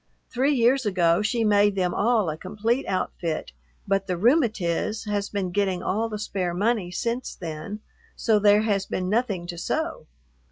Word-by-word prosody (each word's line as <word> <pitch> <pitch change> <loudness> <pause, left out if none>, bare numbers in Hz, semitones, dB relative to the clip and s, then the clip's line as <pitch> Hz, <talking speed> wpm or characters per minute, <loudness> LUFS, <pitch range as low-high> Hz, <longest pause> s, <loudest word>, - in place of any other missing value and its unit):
Three 270 +4 +2
years 255 +2 +3
ago 180 -3 +2
she 225 +2 0
made 205 -1 +4
them 180 -2 0
all 220 -2 +2
a 155 - -2
complete 215 - -2
outfit, 175 -3 -2 0.4
but 195 0 0
the 180 -2 -1
"rheumatiz" 215 - +1
has 205 -2 -2
been 195 -3 -2
getting 190 -2 0
all 220 +4 0
the 215 - -4
spare 185 -4 -3
money 205 -1 0
since 235 +7 -3
then, 165 +5 -6 0.3
so 220 -2 +2
there 205 0 +5
has 200 -3 0
been 185 0 -2
nothing 210 -5 0
to 175 -1 -6
sew. - - -3
205 Hz, 165 wpm, -25 LUFS, 180-225 Hz, 0.4 s, there